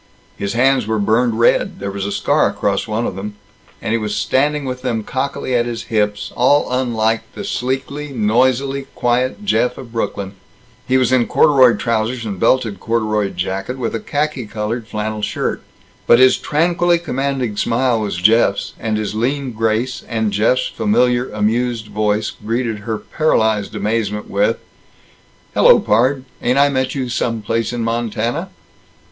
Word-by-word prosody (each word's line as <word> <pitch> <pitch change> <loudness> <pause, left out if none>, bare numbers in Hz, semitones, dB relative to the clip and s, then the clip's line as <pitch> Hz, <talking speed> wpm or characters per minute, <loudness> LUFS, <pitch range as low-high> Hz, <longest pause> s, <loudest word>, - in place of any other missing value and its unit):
His 100 - -3
hands 130 -1 +2
were 110 0 0
burned 110 +3 +1
red; 115 - +2
there 100 0 -4
was 100 0 -3
a - - -3
scar - - +2
across 100 +1 -1
one 110 +2 -1
of - - -3
them; 105 +2 -6 0.5
and - - -2
he 115 - +1
was 105 -1 -3
standing 140 +7 +1
with 125 -1 -4
them 120 -4 -2
cockily 130 +2 -3
at 120 -1 +2
his 115 -1 -4
hips, 105 -1 0
all 135 +3 +3
unlike 115 -3 +1
the 205 - -6
sleekly, 140 -2 -3
noisily 130 +4 +1
quiet 125 +10 0
Jeff 125 -10 +1
of 120 - -10
Brooklyn. 100 -4 -3 0.5
He 130 - +3
was 130 -1 +2
in 125 -2 +3
corduroy 130 -5 +5
trousers 115 +1 -1
and 100 -4 -5
belted 115 -3 +1
corduroy 110 -3 0
jacket, 95 +6 -4
with 120 -3 -3
a 115 - -2
khaki 145 -1 -2
colored 110 +2 -4
flannel 110 -1 -3
shirt. - - -2 0.5
But 120 - +7
his 130 +1 +6
tranquilly 170 +3 +2
commanding 135 -7 -2
smile 120 +1 +1
was 105 -3 -2
Jeff's, 100 0 +2
and 110 -1 -1
his 105 -1 -3
lean 130 +4 -1
grace; 115 +3 -1
and 110 -3 -1
Jeff's 125 +5 +2
familiar 125 - +1
amused 110 +2 -1
voice 105 0 0
greeted 115 0 -3
her 110 +1 -3
paralyzed 110 -8 0
amazement 105 0 -2
with: 105 +3 +2 1.0
"Hello, - - +6
pard! 130 +5 +2 0.2
Ain't 125 +2 +1
I 140 +1 +5
met 130 -1 -1
you 130 -2 -2
some 115 -2 -2
place 115 +1 -1
in 120 -1 -3
Montana?" 115 - -2
115 Hz, 160 wpm, -18 LUFS, 110-130 Hz, 1.0 s, But